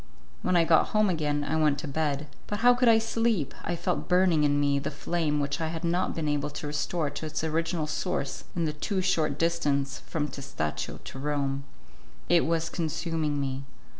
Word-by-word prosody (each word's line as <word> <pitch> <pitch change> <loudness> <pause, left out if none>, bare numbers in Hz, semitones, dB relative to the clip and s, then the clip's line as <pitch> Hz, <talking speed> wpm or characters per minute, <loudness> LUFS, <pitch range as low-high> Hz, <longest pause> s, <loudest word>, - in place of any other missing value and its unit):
When 185 - +1
I 170 - +6
got 160 -1 +4
home 210 -2 +4
again, 150 -3 0
I 150 +2 -1
went 150 -2 +3
to 160 - -5
bed; 145 0 -1 0.2
but 205 +1 -3
how 245 +1 +7
could 245 -1 +4
I 225 - +7
sleep? 225 - 0
I 175 - -1
felt 180 +1 -2
burning 180 -4 +4
in 145 -1 +3
me 140 -1 +2
the - - -3
flame 155 0 -1
which 145 +1 -1
I 160 - 0
had 165 +1 -5
not 175 +2 0
been 160 -2 -2
able 145 0 0
to 150 - -6
restore 150 +1 -1
to 155 +2 -5
its 155 +1 -3
original 165 0 0
source 155 -2 -2
in 170 -1 +1
the 155 - -1
too 190 +5 -2
short 155 -6 +1
distance 145 -5 0
from 150 -2 -1
Testaccio 135 - -4
to 135 - -8
Rome. 140 -1 -1 0.6
It 175 -2 +4
was 165 0 +1
consuming 160 -2 -1
me. 135 -1 -2
155 Hz, 195 wpm, -28 LUFS, 145-170 Hz, 0.6 s, how